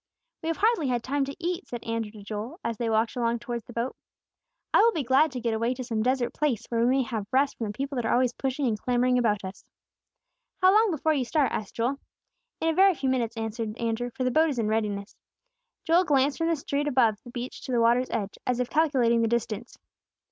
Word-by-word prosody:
"We 320 Hz, -, -5 dB
have 330 Hz, -, -1 dB
hardly 425 Hz, -, +2 dB
had 245 Hz, -2 st, 0 dB
time 280 Hz, +1 st, 0 dB
to 280 Hz, +1 st, -6 dB
eat," 350 Hz, +2 st, -3 dB
said 240 Hz, -1 st, -6 dB
Andrew 230 Hz, -1 st, -2 dB
to 210 Hz, -2 st, -11 dB
Joel, 215 Hz, -, -6 dB
as 230 Hz, -1 st, -2 dB
they 235 Hz, -2 st, 0 dB
walked 225 Hz, +1 st, +1 dB
along 235 Hz, -1 st, 0 dB
towards 235 Hz, 0 st, -5 dB
the 240 Hz, -, -11 dB
boat 235 Hz, +3 st, -2 dB, 0.8 s
"I -, -, +6 dB
will 465 Hz, +1 st, +5 dB
be 310 Hz, -, -1 dB
glad 270 Hz, +5 st, +3 dB
to 255 Hz, -, -4 dB
get 235 Hz, -1 st, -1 dB
away 230 Hz, +3 st, 0 dB
to 255 Hz, -, -5 dB
some 230 Hz, -3 st, -2 dB
desert 250 Hz, 0 st, 0 dB
place, 285 Hz, -8 st, -1 dB
where 230 Hz, -1 st, 0 dB
we 235 Hz, -, +3 dB
may 265 Hz, +2 st, +3 dB
have 220 Hz, -3 st, -4 dB
rest 270 Hz, +2 st, +2 dB
from 225 Hz, -, -4 dB
the 205 Hz, -, -4 dB
people 275 Hz, 0 st, -3 dB
that 240 Hz, -, -1 dB
are -, -, 0 dB
always 250 Hz, -1 st, +2 dB
pushing 270 Hz, +2 st, -2 dB
and 220 Hz, -4 st, 0 dB
clamoring 250 Hz, 0 st, +2 dB
about 210 Hz, -4 st, +1 dB
us." 190 Hz, +2 st, -8 dB, 1.0 s
"How 370 Hz, 0 st, +6 dB
long 435 Hz, +1 st, +5 dB
before 315 Hz, -2 st, +1 dB
you 275 Hz, -4 st, 0 dB
start?" 280 Hz, +3 st, +1 dB
asked 210 Hz, -, -4 dB
Joel. 250 Hz, +4 st, -1 dB, 0.6 s
"In 325 Hz, -, +1 dB
a -, -, +2 dB
very 385 Hz, +2 st, +5 dB
few 270 Hz, -2 st, -1 dB
minutes," 235 Hz, -3 st, -1 dB
answered 225 Hz, 0 st, -4 dB
Andrew; 235 Hz, +1 st, -2 dB
"for 260 Hz, -, -1 dB
the 255 Hz, -, +1 dB
boat 315 Hz, +4 st, +4 dB
is 275 Hz, -, -3 dB
in 225 Hz, -2 st, 0 dB
readiness." 210 Hz, -2 st, -2 dB, 0.7 s
Joel 340 Hz, +2 st, +4 dB
glanced 280 Hz, -3 st, +2 dB
from 330 Hz, -, +1 dB
the 335 Hz, -, +2 dB
street 285 Hz, 0 st, -2 dB
above 245 Hz, -6 st, +3 dB
the -, -, -11 dB
beach 245 Hz, +1 st, -6 dB
to -, -, -5 dB
the 240 Hz, -, +2 dB
water's 240 Hz, +2 st, +3 dB
edge, 200 Hz, -3 st, -3 dB
as 250 Hz, -1 st, +1 dB
if 250 Hz, -1 st, -2 dB
calculating 260 Hz, -7 st, +3 dB
the 230 Hz, -, +2 dB
distance. 235 Hz, 0 st, -3 dB
245 Hz, 240 wpm, -27 LUFS, 230-280 Hz, 1.0 s, I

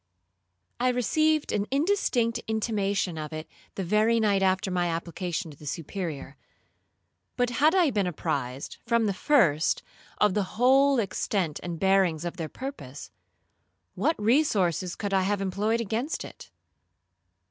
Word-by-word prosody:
I 250 Hz, +1 st, +2 dB
received 305 Hz, +6 st, +1 dB
an 205 Hz, 0 st, -1 dB
indistinct 270 Hz, -, +1 dB
intimation 205 Hz, -6 st, -1 dB
of 155 Hz, 0 st, -5 dB
it 155 Hz, 0 st, -6 dB, 0.3 s
the 195 Hz, -, -3 dB
very 215 Hz, +5 st, +3 dB
night 205 Hz, -3 st, +2 dB
after 190 Hz, 0 st, +1 dB
my 175 Hz, -1 st, +1 dB
application 170 Hz, +1 st, -3 dB
to 145 Hz, -, -14 dB
the 150 Hz, -, -11 dB
Superior; 155 Hz, -3 st, -5 dB, 1.0 s
but 245 Hz, -1 st, +1 dB
had 300 Hz, +8 st, +3 dB
I 345 Hz, -7 st, +4 dB
been 205 Hz, -5 st, 0 dB
apprised, 135 Hz, -5 st, -3 dB
from 235 Hz, -1 st, +2 dB
the 200 Hz, -, +1 dB
first, 185 Hz, -, +2 dB, 0.3 s
of 210 Hz, -2 st, +3 dB
the 205 Hz, 0 st, -2 dB
whole 270 Hz, +3 st, +5 dB
extent 190 Hz, -5 st, -1 dB
and 170 Hz, -2 st, -5 dB
bearings 190 Hz, -4 st, +2 dB
of 175 Hz, -, -4 dB
their 160 Hz, -3 st, -4 dB
purpose, 150 Hz, -, -8 dB, 0.8 s
what 320 Hz, -, 0 dB
resources 205 Hz, -, +2 dB
could 200 Hz, -2 st, -4 dB
I 190 Hz, -, +4 dB
have 200 Hz, +2 st, 0 dB
employed 205 Hz, +4 st, 0 dB
against 230 Hz, +7 st, -2 dB
it? -, -, -12 dB
200 Hz, 140 wpm, -27 LUFS, 175-235 Hz, 1.0 s, whole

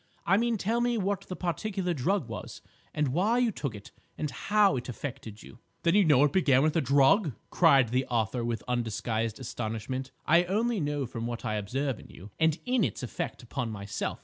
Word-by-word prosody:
I 190 Hz, -, +4 dB
mean 230 Hz, +2 st, +1 dB
tell 225 Hz, +5 st, 0 dB
me 240 Hz, -1 st, +1 dB
what 200 Hz, -2 st, -1 dB
the 185 Hz, -, -5 dB
particular 180 Hz, +1 st, -2 dB
drug 165 Hz, -, 0 dB
was, 115 Hz, -2 st, -8 dB, 0.3 s
and 150 Hz, -2 st, 0 dB
why 195 Hz, -, +2 dB
you 245 Hz, -2 st, +2 dB
took 140 Hz, -, -4 dB
it, 100 Hz, -, -11 dB, 0.3 s
and 150 Hz, -2 st, -2 dB
how 205 Hz, +4 st, +3 dB
it 125 Hz, 0 st, -4 dB
affected 115 Hz, -4 st, -7 dB
you—" -, -, -14 dB, 0.2 s
"Then 170 Hz, -, +3 dB
you 205 Hz, -, +6 dB
know 145 Hz, -5 st, +5 dB
it 145 Hz, -, +2 dB
began 140 Hz, -8 st, +4 dB
with 155 Hz, +1 st, +1 dB
a 165 Hz, -, +3 dB
drug!" 145 Hz, -, +4 dB, 0.2 s
cried 140 Hz, -8 st, +5 dB
the 130 Hz, +3 st, 0 dB
author, 120 Hz, 0 st, -1 dB
with 115 Hz, -1 st, -2 dB
undisguised 115 Hz, -1 st, -2 dB
astonishment. 120 Hz, +2 st, -4 dB, 0.2 s
"I 170 Hz, +3 st, +5 dB
only 220 Hz, +4 st, 0 dB
know 145 Hz, -3 st, -1 dB
from 115 Hz, -1 st, -5 dB
what 120 Hz, 0 st, -5 dB
I 110 Hz, -, -1 dB
observe 125 Hz, +5 st, -2 dB
in -, -, -13 dB
you, 100 Hz, +4 st, -13 dB
and 160 Hz, -1 st, +3 dB
in 250 Hz, -3 st, +2 dB
its -, -, -2 dB
effect 125 Hz, -, -5 dB
upon 120 Hz, 0 st, -3 dB
myself. 100 Hz, -2 st, -4 dB
140 Hz, 200 wpm, -29 LUFS, 120-190 Hz, 0.3 s, you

